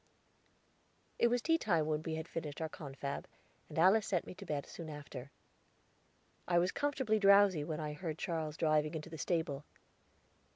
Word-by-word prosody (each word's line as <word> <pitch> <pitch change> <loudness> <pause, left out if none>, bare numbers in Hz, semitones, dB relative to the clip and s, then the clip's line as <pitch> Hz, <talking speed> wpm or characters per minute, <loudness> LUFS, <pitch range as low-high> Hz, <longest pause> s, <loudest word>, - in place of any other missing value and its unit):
It - - +6
was 240 0 +1
tea 325 0 +3
time 170 - +2
when 155 0 0
we 160 0 -3
had 160 +1 -5
finished 150 -4 -5
our 160 -1 -2
confab, 140 -2 -5 0.4
and - - -8
Alice 190 +6 +5
sent 180 -4 0
me - - -8
to - - -11
bed 145 -2 -2
soon 165 -2 -8
after. 145 -3 -8 1.2
I 175 - +3
was 180 +2 +3
comfortably 265 -7 +1
drowsy 200 -5 +6
when 155 +1 -3
I 150 -1 -3
heard 160 0 -4
Charles 160 -3 -3
driving 155 0 +2
into 160 +1 -6
the 160 - -7
stable. 145 0 -1
160 Hz, 170 wpm, -35 LUFS, 150-185 Hz, 1.2 s, It